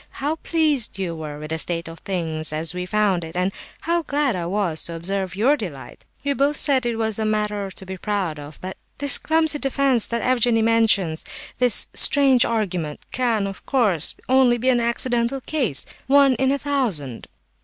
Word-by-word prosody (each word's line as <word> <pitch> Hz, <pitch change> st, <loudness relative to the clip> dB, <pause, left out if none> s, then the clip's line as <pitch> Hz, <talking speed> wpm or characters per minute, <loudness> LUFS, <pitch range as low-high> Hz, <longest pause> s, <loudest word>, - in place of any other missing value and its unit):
How 295 Hz, +4 st, -2 dB
pleased 310 Hz, -10 st, 0 dB
you 180 Hz, -4 st, -3 dB
were 155 Hz, -2 st, -7 dB
with 155 Hz, +1 st, -8 dB
the 160 Hz, -, 0 dB
state 170 Hz, +1 st, -1 dB
of 165 Hz, 0 st, -10 dB
things 160 Hz, -5 st, +1 dB
as 160 Hz, +2 st, -3 dB
we 180 Hz, 0 st, -5 dB
found 200 Hz, -4 st, +1 dB
it, 160 Hz, +1 st, -9 dB
and 180 Hz, +2 st, 0 dB, 0.3 s
how 340 Hz, +1 st, 0 dB
glad 290 Hz, -, -1 dB
I 170 Hz, -2 st, -3 dB
was 180 Hz, -4 st, -1 dB
to 170 Hz, -, -5 dB
observe 190 Hz, +2 st, -3 dB
your 245 Hz, +9 st, +3 dB
delight! 140 Hz, -, -8 dB, 0.2 s
We 285 Hz, -, +1 dB
both 280 Hz, +2 st, 0 dB
said 265 Hz, -4 st, +3 dB
it 235 Hz, -, -1 dB
was 220 Hz, -1 st, -1 dB
a -, -, 0 dB
matter 210 Hz, -2 st, -1 dB
to 190 Hz, -, -7 dB
be 190 Hz, 0 st, -7 dB
proud 190 Hz, -7 st, -2 dB
of; 145 Hz, +1 st, -11 dB
but 185 Hz, +1 st, -7 dB, 0.2 s
this 285 Hz, -1 st, +3 dB
clumsy 315 Hz, -2 st, +2 dB
defence 270 Hz, -3 st, +2 dB
that 235 Hz, 0 st, -3 dB
Evgenie 240 Hz, -3 st, +2 dB
mentions, 215 Hz, -8 st, +2 dB, 0.4 s
this 245 Hz, -3 st, +3 dB
strange 270 Hz, -4 st, +5 dB
argument 180 Hz, -9 st, -3 dB
can, 235 Hz, -5 st, 0 dB
of 195 Hz, -1 st, -7 dB
course, 210 Hz, -, +2 dB
only 255 Hz, -2 st, +4 dB
be 250 Hz, +3 st, 0 dB
an 245 Hz, -2 st, +3 dB
accidental 235 Hz, +2 st, 0 dB
case—one 270 Hz, -, +1 dB
in 265 Hz, +2 st, +1 dB
a 280 Hz, -, +1 dB
thousand!" 225 Hz, -, -3 dB
220 Hz, 185 wpm, -22 LUFS, 175-265 Hz, 0.4 s, strange